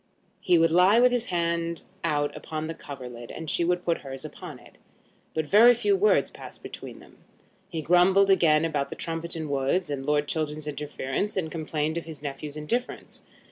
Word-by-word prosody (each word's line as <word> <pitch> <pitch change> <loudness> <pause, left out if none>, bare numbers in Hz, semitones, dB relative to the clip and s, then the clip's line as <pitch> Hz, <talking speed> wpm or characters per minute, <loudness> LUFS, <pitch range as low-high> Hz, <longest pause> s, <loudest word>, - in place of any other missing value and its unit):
He 180 -2 +3
would 165 0 +4
lie 185 +6 +5
with 250 0 +5
his 245 -1 -1
hand 170 -1 -1 0.2
out 145 -3 0
upon 155 0 -5
the 165 - -4
coverlid, 125 -6 -9
and 160 - -7
she 160 - +1
would 180 +1 0
put 170 -1 +1
hers 135 -1 -8
upon - - -9
it; - - -19 0.6
but 160 -1 0
very 225 +9 +7
few 400 - +2
words 415 +3 +3
passed - - -11
between - - -8
them. - - -17 0.5
He 165 -4 -4
grumbled 185 +4 +5
again 165 -4 +4
about 145 -3 -1
the - - -6
Trumpeton 165 -1 -4
Woods, 140 +5 0
and 135 -2 -3
Lord 150 +1 +1
Chiltern's 155 0 -3
interference, 150 +5 -3
and 160 -4 -2
complained 155 0 -2
of - - -12
his 155 -3 -9
nephew's 145 +1 -6
indifference. 235 +12 -4
160 Hz, 180 wpm, -26 LUFS, 150-180 Hz, 0.6 s, very